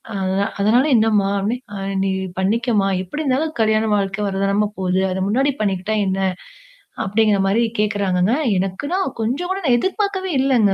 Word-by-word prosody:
"அத 190 Hz, -1 st, -1 dB, 0.2 s
அதனால 220 Hz, +6 st, +4 dB
என்னம்மா? 215 Hz, -3 st, +3 dB
அப்டே 220 Hz, +5 st, -1 dB, 0.2 s
அப்டி 195 Hz, 0 st, -4 dB
அ -, -, 0 dB
நீ 195 Hz, -, 0 dB, 0.3 s
பண்ணிக்கம்மா? 210 Hz, +1 st, +1 dB
எப்படி 295 Hz, -, -5 dB
இருந்தாலும் 295 Hz, +4 st, 0 dB
கல்யாணம் 215 Hz, -1 st, +2 dB
வாழ்க்கை 195 Hz, +1 st, -2 dB
வரதானம 200 Hz, +2 st, 0 dB
போகுது. 185 Hz, 0 st, +1 dB
அத 185 Hz, -, -2 dB
முன்னாடி 270 Hz, +6 st, +2 dB
பண்ணிக்கிட்டா 200 Hz, +1 st, -1 dB
என்ன? 190 Hz, 0 st, -1 dB, 0.9 s
அப்படிங்கிற 210 Hz, +1 st, +2 dB
மாரி" 215 Hz, +5 st, +2 dB, 0.2 s
கேட்கறாங்கங்க. 200 Hz, -1 st, +1 dB, 0.2 s
எனக்குன்னா 195 Hz, -, -2 dB, 0.2 s
கொஞ்சம் 270 Hz, +11 st, -2 dB
கூட 385 Hz, -, -1 dB
நான் 245 Hz, -4 st, +4 dB
எதிர்பார்க்கவே 385 Hz, -, -1 dB
இல்லங்க. 240 Hz, -7 st, +3 dB
210 Hz, 150 wpm, -20 LUFS, 195-245 Hz, 0.9 s, அதனால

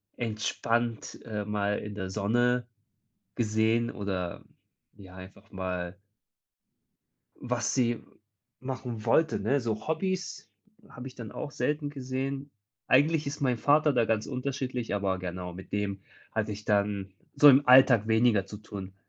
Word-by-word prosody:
entspannt, 115 Hz, 0 st, -2 dB
äh, 105 Hz, -2 st, -3 dB
mal 105 Hz, 0 st, 0 dB
in 105 Hz, -1 st, -7 dB
der 95 Hz, -2 st, -4 dB
Sonne 120 Hz, +5 st, +1 dB, 0.7 s
gesehen, 110 Hz, +1 st, +1 dB
oder 95 Hz, -4 st, -4 dB, 0.5 s
ja, 95 Hz, -3 st, -13 dB
einfach 95 Hz, +1 st, -13 dB
mal 90 Hz, -1 st, -4 dB, 1.4 s
was 120 Hz, -2 st, -1 dB
sie 120 Hz, -3 st, +1 dB, 0.6 s
machen 130 Hz, -4 st, -5 dB
wollte, 160 Hz, -1 st, +3 dB
ne? 140 Hz, +1 st, +1 dB
So 110 Hz, -2 st, -3 dB
Hobbys 185 Hz, +4 st, -2 dB, 0.4 s
habe 125 Hz, +1 st, -8 dB
ich 130 Hz, -, -11 dB
dann 115 Hz, -4 st, -8 dB
auch 145 Hz, -, -5 dB
selten 150 Hz, 0 st, -1 dB
gesehen. 135 Hz, +1 st, -4 dB, 0.4 s
Eigentlich 150 Hz, +3 st, +4 dB
ist 145 Hz, +1 st, -5 dB
mein 125 Hz, -3 st, +2 dB
Vater 150 Hz, +5 st, +4 dB
da 120 Hz, -2 st, +3 dB
ganz 110 Hz, -1 st, 0 dB
unterschiedlich, 130 Hz, -3 st, -3 dB
aber 95 Hz, -2 st, 0 dB
genau, 90 Hz, -1 st, -5 dB
mit 95 Hz, +2 st, -11 dB
dem 100 Hz, -1 st, -2 dB, 0.3 s
hatte 110 Hz, -1 st, -1 dB
ich 105 Hz, +1 st, -9 dB
dann 100 Hz, -2 st, 0 dB, 0.2 s
so 145 Hz, -, +9 dB
im 135 Hz, 0 st, +5 dB
Alltag 125 Hz, -4 st, +7 dB
weniger 110 Hz, -3 st, +3 dB
zu 105 Hz, +1 st, -9 dB
tun. 100 Hz, -2 st, -8 dB
115 Hz, 140 wpm, -29 LUFS, 100-130 Hz, 1.4 s, so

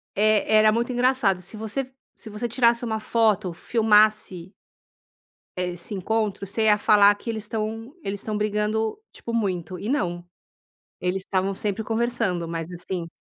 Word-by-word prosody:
e 215 Hz, 0 st, +3 dB
era 215 Hz, 0 st, +5 dB
muito 235 Hz, +3 st, 0 dB
engraçado, 245 Hz, -7 st, +2 dB
se 190 Hz, +5 st, -8 dB
você 235 Hz, +5 st, -4 dB, 0.2 s
se 220 Hz, -, -10 dB
você 210 Hz, +3 st, -3 dB
tirasse 235 Hz, 0 st, +2 dB
uma 220 Hz, -1 st, -2 dB
foto, 215 Hz, -4 st, +1 dB
filmasse 210 Hz, -3 st, +2 dB, 1.1 s
eh, 180 Hz, 0 st, -1 dB
esse 175 Hz, +4 st, -5 dB
encontro, 205 Hz, +1 st, -1 dB
você 220 Hz, +3 st, -1 dB
ia 210 Hz, -1 st, +5 dB
falar 205 Hz, -1 st, +6 dB
que 215 Hz, -, -8 dB
eles 220 Hz, -2 st, -3 dB
estão 225 Hz, +3 st, -4 dB
eles 195 Hz, +1 st, -3 dB
estão 215 Hz, -1 st, -3 dB
brigando, 210 Hz, +1 st, -1 dB
tipo, 235 Hz, -, -7 dB
muito, 185 Hz, -6 st, -2 dB
e 205 Hz, -, -4 dB
não. 175 Hz, -10 st, -1 dB, 0.8 s
Eles 180 Hz, +1 st, -1 dB
estavam 190 Hz, 0 st, -1 dB
sempre 210 Hz, +2 st, -3 dB
conversando, 225 Hz, -7 st, -1 dB
mas, 165 Hz, +1 st, -5 dB
assim, 175 Hz, 0 st, -5 dB
210 Hz, 155 wpm, -24 LUFS, 190-225 Hz, 1.1 s, falar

